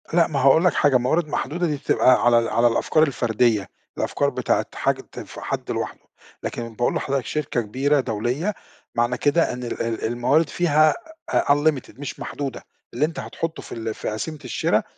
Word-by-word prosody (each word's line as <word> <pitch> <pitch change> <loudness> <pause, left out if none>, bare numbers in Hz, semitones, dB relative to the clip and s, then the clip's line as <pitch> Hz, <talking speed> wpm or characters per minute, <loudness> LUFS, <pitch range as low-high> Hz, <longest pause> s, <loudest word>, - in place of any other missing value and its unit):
لأ 170 -1 +5
ما 145 -3 -2
هاقول 140 +6 +5
لك 180 - +4
حاجة 145 -3 +4
موارد 150 +7 +1
محدودة 170 +4 -1
دي 150 - 0
بتبقى 130 -2 +3
على 120 -1 +6
ال 115 - -1
على 115 +2 +3
الأفكار 120 +6 +2
الفردية، 115 -7 +1 0.3
الأفكار - - 0
بتاعة - - 0
حاجة - - 0
بتنفع - - -10
حد - - -3
لوحده، - - -3 0.4
لكن 115 -1 -5
باقول 120 +2 0
لحضرتك 135 -2 -1
شركة 150 -5 -1
كبيرة 135 +7 +1
دولية، 125 - -1 0.4
معنى 120 +1 +1
كده 150 +1 +2
إن 125 0 -6
ال 120 - -4
ال 115 -1 -2
الموارد 125 +7 +2
فيها 155 -2 +3 0.4
unlimited 145 -2 +1
مش 145 - -6
محدودة، 140 -2 -5 0.3
اللي 135 +5 +2
أنت 165 +3 -5
هتحطُّه 165 0 -4
في - - -13
ال 110 -1 -3
في - - -4
قسيمة 150 +9 -4
الشرا 125 - +1
135 Hz, 175 wpm, -23 LUFS, 120-155 Hz, 0.4 s, على